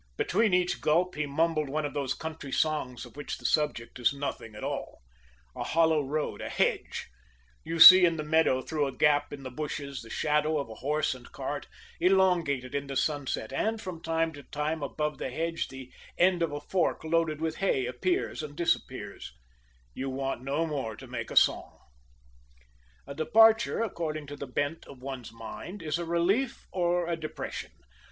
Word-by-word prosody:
Between 215 Hz, +3 st, +2 dB
each 180 Hz, 0 st, +1 dB
gulp 175 Hz, +4 st, +2 dB
he 150 Hz, 0 st, -2 dB
mumbled 155 Hz, 0 st, +1 dB
one 150 Hz, +2 st, -1 dB
of 145 Hz, -, -4 dB
those 140 Hz, -3 st, -1 dB
country 160 Hz, -3 st, -7 dB
songs 130 Hz, -6 st, -1 dB
of 120 Hz, -, -15 dB
which 145 Hz, 0 st, -5 dB
the -, -, -15 dB
subject 150 Hz, -6 st, 0 dB
is 120 Hz, -, +3 dB
nothing 140 Hz, -6 st, -5 dB
at 105 Hz, -, -8 dB
all: -, -, -5 dB, 0.5 s
a -, -, -3 dB
hollow 160 Hz, -2 st, +3 dB
road, 145 Hz, +2 st, -3 dB
a -, -, -4 dB
hedge; -, -, -1 dB, 0.6 s
you 165 Hz, +1 st, -3 dB
see 185 Hz, +3 st, +12 dB
in 170 Hz, -2 st, +4 dB
the 155 Hz, -, -3 dB
meadow, 150 Hz, -4 st, +2 dB
through 150 Hz, -3 st, -1 dB
a 130 Hz, -2 st, -7 dB
gap 150 Hz, -1 st, +3 dB
in 140 Hz, -2 st, -8 dB
the 130 Hz, -, -6 dB
bushes, 140 Hz, 0 st, -5 dB
the 115 Hz, -, -12 dB
shadow 150 Hz, +3 st, +1 dB
of 140 Hz, -, -2 dB
a 110 Hz, -, -11 dB
horse 150 Hz, +1 st, +1 dB
and 125 Hz, -1 st, -13 dB
cart, 140 Hz, +1 st, -5 dB, 0.3 s
elongated 175 Hz, -8 st, +2 dB
in 140 Hz, 0 st, -2 dB
the 135 Hz, -, -5 dB
sunset, 135 Hz, -5 st, -1 dB
and 220 Hz, +10 st, 0 dB
from 185 Hz, -6 st, -7 dB
time 165 Hz, -1 st, 0 dB
to 145 Hz, -, -10 dB
time, 150 Hz, +3 st, -3 dB
above 150 Hz, +2 st, -2 dB
the -, -, -3 dB
hedge, 165 Hz, +5 st, -2 dB
the 130 Hz, -1 st, -10 dB, 0.3 s
end 180 Hz, 0 st, +4 dB
of 165 Hz, -3 st, +1 dB
a 145 Hz, -, -4 dB
fork 180 Hz, +2 st, 0 dB
loaded 160 Hz, -1 st, +1 dB
with 160 Hz, 0 st, -2 dB
hay 135 Hz, -10 st, +1 dB
appears 125 Hz, +9 st, -1 dB
and 150 Hz, -1 st, -7 dB
disappears 170 Hz, -, -2 dB, 0.6 s
you 135 Hz, -, -4 dB
want 135 Hz, -1 st, -3 dB
no 140 Hz, +5 st, -1 dB
more 135 Hz, -8 st, -3 dB
to -, -, -11 dB
make -, -, -5 dB
a -, -, -7 dB
song. -, -, +3 dB, 1.3 s
A -, -, -7 dB
departure, 225 Hz, +9 st, +4 dB
according 155 Hz, -7 st, -3 dB
to 145 Hz, +1 st, -8 dB
the 140 Hz, -, -7 dB
bent 145 Hz, +5 st, -2 dB
of 130 Hz, -2 st, -13 dB
one's 130 Hz, -4 st, -6 dB
mind, 140 Hz, -, -8 dB
is 155 Hz, +1 st, -1 dB
a 170 Hz, -, -3 dB
relief 185 Hz, +10 st, 0 dB
or 175 Hz, -1 st, +1 dB
a 170 Hz, -, 0 dB
depression. 155 Hz, -2 st, -6 dB
150 Hz, 185 wpm, -29 LUFS, 140-165 Hz, 1.3 s, see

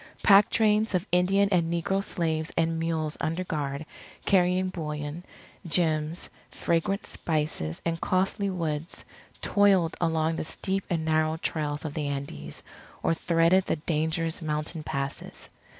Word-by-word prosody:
Pack 200 Hz, 0 st, +7 dB
trains 215 Hz, -1 st, +3 dB
of 180 Hz, +1 st, 0 dB
Indian 190 Hz, +3 st, +4 dB
and 170 Hz, -3 st, +2 dB
negro 195 Hz, +3 st, 0 dB
slaves 160 Hz, -4 st, -1 dB
and 165 Hz, 0 st, +1 dB
mules 160 Hz, -2 st, -1 dB
under 165 Hz, +4 st, -1 dB
guard, 145 Hz, -3 st, -3 dB, 0.4 s
carrying 185 Hz, -1 st, +3 dB
bullion, 150 Hz, -1 st, -5 dB, 0.4 s
gems, 160 Hz, -1 st, +1 dB, 0.2 s
fragrant 170 Hz, +4 st, -1 dB
spices, 150 Hz, -, -2 dB
and 165 Hz, 0 st, -1 dB
costly 190 Hz, +2 st, +1 dB
woods, 165 Hz, -3 st, -3 dB, 0.4 s
toiled 195 Hz, -5 st, +3 dB
along 160 Hz, -1 st, +1 dB
the -, -, -2 dB
steep 190 Hz, +4 st, -3 dB
and 165 Hz, -3 st, -1 dB
narrow 155 Hz, 0 st, +2 dB
trails 150 Hz, -2 st, -2 dB
of 150 Hz, -, -4 dB
the 150 Hz, -3 st, -2 dB
Andes, 75 Hz, -, -5 dB, 0.4 s
or -, -, +3 dB
threaded 170 Hz, +3 st, +3 dB
the -, -, +1 dB
dangerous 160 Hz, +1 st, -1 dB
mountain 155 Hz, +1 st, -2 dB
passes. 140 Hz, -2 st, -5 dB
165 Hz, 135 wpm, -27 LUFS, 155-180 Hz, 0.4 s, Pack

